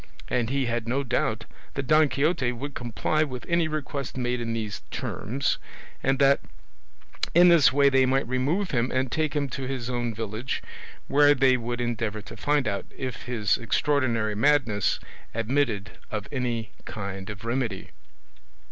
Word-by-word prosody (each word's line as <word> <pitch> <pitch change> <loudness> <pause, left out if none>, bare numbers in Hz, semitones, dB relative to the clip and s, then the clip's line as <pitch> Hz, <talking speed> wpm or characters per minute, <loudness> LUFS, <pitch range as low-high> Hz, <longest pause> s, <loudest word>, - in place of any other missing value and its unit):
And 120 -2 +1
he 135 0 +1
had 120 -1 -2
no 135 +4 0
doubt 110 -3 0 0.3
that 140 - -2
Don 155 +1 +5
Quixote 140 -3 +1
would 140 +4 -6
comply 120 - -1
with 130 -5 -5
any 170 -1 +2
request 145 -4 -4
made 125 -1 -1
in 115 -1 -2
these 110 -3 -4
terms, 135 +6 -2 0.4
and 135 0 +2
that 140 0 +5 1.0
in 175 +1 +8
this 170 -5 +7
way 140 +1 +4
they 135 -1 +4
might 135 0 +1
remove 145 +10 0
him 120 -1 +1
and 130 -1 0
take 155 -2 0
him 145 -1 +1
to 130 0 -4
his 130 -2 -3
own 120 -1 -1
village, 110 +3 -4 0.4
where 145 +1 +5
they 130 -1 +5
would 120 0 -3
endeavour 110 -3 -2
to 105 - -10
find 145 -3 +1
out 100 -1 -2
if 130 -3 -5
his 110 -5 +1
extraordinary 115 -3 +1
madness 115 -4 +2 0.4
admitted 115 -3 -1
of 105 -1 -4
any 120 -5 -2
kind 100 -1 -5
of 105 +1 -7
remedy. 115 -5 -2
125 Hz, 160 wpm, -26 LUFS, 115-140 Hz, 1.0 s, in